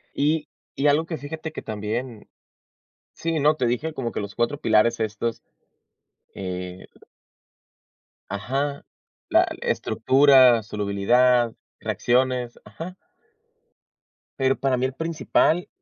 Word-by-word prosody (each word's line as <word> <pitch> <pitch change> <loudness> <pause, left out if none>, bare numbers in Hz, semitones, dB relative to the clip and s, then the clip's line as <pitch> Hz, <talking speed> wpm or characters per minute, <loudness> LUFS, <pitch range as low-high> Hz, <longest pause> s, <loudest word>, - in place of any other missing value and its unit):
Y 150 +1 +1 0.3
y 145 - +1
algo 150 +3 +3
que 165 -1 -4
fíjate 160 +2 -6
que 155 - -7
también 110 +2 -5 0.9
sí, 165 -1 -2
no, 150 +2 +4
te 130 - 0
dije 150 +7 -1
como 120 -5 -3
que - - -3
los 100 0 -6
4 120 +5 -1
pilares 115 -1 +3
estos, 110 +1 -2 0.9
eh 90 -1 -6 1.4
Ajá, 135 +8 -2 0.5
la - - +5
l - - -5
estructura, 130 -4 +4
solubilidad, 115 +4 +2 0.3
reacciones, 125 -1 0
ajá. 165 +12 -8 1.4
Pero 135 0 +2
para 135 -2 +1
mí 125 - 0
el 130 - -2
principal 165 +3 +1
125 Hz, 115 wpm, -24 LUFS, 110-145 Hz, 1.4 s, la